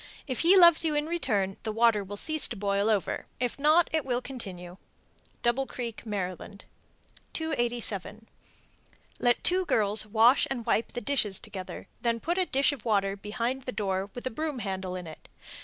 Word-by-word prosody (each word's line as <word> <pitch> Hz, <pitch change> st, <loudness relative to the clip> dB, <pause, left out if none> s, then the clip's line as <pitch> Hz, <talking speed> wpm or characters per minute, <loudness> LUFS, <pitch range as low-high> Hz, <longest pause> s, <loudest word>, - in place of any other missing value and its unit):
If 255 Hz, -4 st, -3 dB
he 360 Hz, +4 st, +6 dB
loves 340 Hz, -3 st, +7 dB
you 310 Hz, -2 st, 0 dB
in 295 Hz, 0 st, 0 dB
return, 205 Hz, -, -1 dB
the 220 Hz, -, -3 dB
water 225 Hz, -2 st, +3 dB
will 205 Hz, +1 st, -7 dB
cease 310 Hz, +7 st, +3 dB
to -, -, -6 dB
boil 200 Hz, +1 st, 0 dB
over; 210 Hz, -4 st, -1 dB
if 250 Hz, +1 st, -2 dB
not, 310 Hz, +4 st, +4 dB
it 315 Hz, -2 st, +1 dB
will 245 Hz, -2 st, -1 dB
continue. 190 Hz, -9 st, -8 dB, 0.7 s
Double 245 Hz, +3 st, +1 dB
Creek, 235 Hz, -3 st, -6 dB
Md. 195 Hz, 0 st, -5 dB, 0.7 s
287. 235 Hz, -, 0 dB, 0.9 s
Let 240 Hz, -1 st, +2 dB
two 370 Hz, +1 st, +3 dB
girls 215 Hz, -, +3 dB
wash 225 Hz, +5 st, +4 dB
and 245 Hz, -4 st, -4 dB
wipe 230 Hz, -1 st, 0 dB
the 245 Hz, -, -3 dB
dishes 230 Hz, -9 st, 0 dB
together, 195 Hz, -4 st, -7 dB
then 230 Hz, -1 st, 0 dB
put 345 Hz, +8 st, -1 dB
a 365 Hz, -, +1 dB
dish 275 Hz, +2 st, +2 dB
of 285 Hz, -, -8 dB
water 200 Hz, -3 st, +1 dB
behind 235 Hz, +6 st, -4 dB
the 255 Hz, -, -3 dB
door 195 Hz, -3 st, -2 dB
with 245 Hz, -, -7 dB
a 255 Hz, -, -2 dB
broom 305 Hz, +2 st, -3 dB
handle 190 Hz, -4 st, -4 dB
in 180 Hz, -1 st, -6 dB
it. 160 Hz, -1 st, -12 dB
230 Hz, 175 wpm, -28 LUFS, 200-270 Hz, 0.9 s, loves